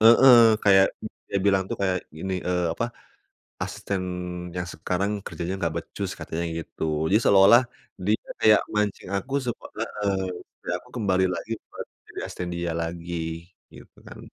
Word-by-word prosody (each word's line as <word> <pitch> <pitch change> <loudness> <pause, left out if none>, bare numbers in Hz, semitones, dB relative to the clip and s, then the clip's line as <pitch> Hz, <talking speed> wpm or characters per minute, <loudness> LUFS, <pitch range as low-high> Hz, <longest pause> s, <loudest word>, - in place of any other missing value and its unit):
heeh, 125 -3 +8 0.2
kayak 95 -1 +7 0.4
dia 100 - -1
bilang 95 -1 +4
tuh - - -3
kayak 95 -2 +2 0.2
gini, 95 +3 -3
eee, 90 -1 +1
apa, 115 - -1 0.8
asisten 95 -2 -3 0.5
yang 90 0 -3
sekarang 90 +5 -1
kerjanya 85 +3 -4
nggak 80 -3 -1
becus - - -5
katanya 85 +1 -3
gitu - - -7 0.3
jadi 105 - +5
seolah-olah 100 +5 +7 0.4
dia 105 +2 +2 0.2
kayak 105 -2 +6
mancing 105 -3 -1
aku 130 +7 -6
supa 120 - -4 0.2
heeh, 105 -3 -1 0.4
supaya - - -5
aku - - -20
kembali 95 -5 +2
lagi 110 +5 -6 0.2
buat - - -7 0.2
jadi - - -8
asisten 90 - -5
dia 85 0 -2
lagi, 85 +1 -5 0.6
gitu - - -15
kan. - - -10
95 Hz, 150 wpm, -25 LUFS, 90-105 Hz, 0.8 s, heeh